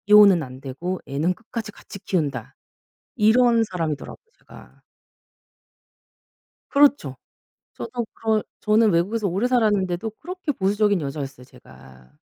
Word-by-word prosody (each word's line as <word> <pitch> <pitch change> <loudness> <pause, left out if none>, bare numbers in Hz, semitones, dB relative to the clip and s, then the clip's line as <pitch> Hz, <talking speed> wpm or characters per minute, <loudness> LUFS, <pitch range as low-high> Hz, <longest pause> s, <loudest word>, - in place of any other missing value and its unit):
이혼은 205 -4 +7
안 130 -1 -10
되고 170 +7 -4
애는 150 +6 0
끝까지 225 +2 -7
같이 200 - -12
키운다 170 -7 -3 0.6
이런 230 +1 +4
사람이더라고요 165 - -5
제가. - - -17 1.9
그렇죠. 280 - +3 0.6
저도 225 - -5
그런 220 -1 0 0.2
저는 215 +1 +3
외국에서 200 +5 0
오래 195 +7 0
살았는데도 210 -5 +1
그렇게 360 -2 -4
보수적인 205 -2 +1
여자였어요 140 -3 -6
제가. 65 - -17
200 Hz, 300 characters per minute, -23 LUFS, 155-225 Hz, 1.9 s, 이혼은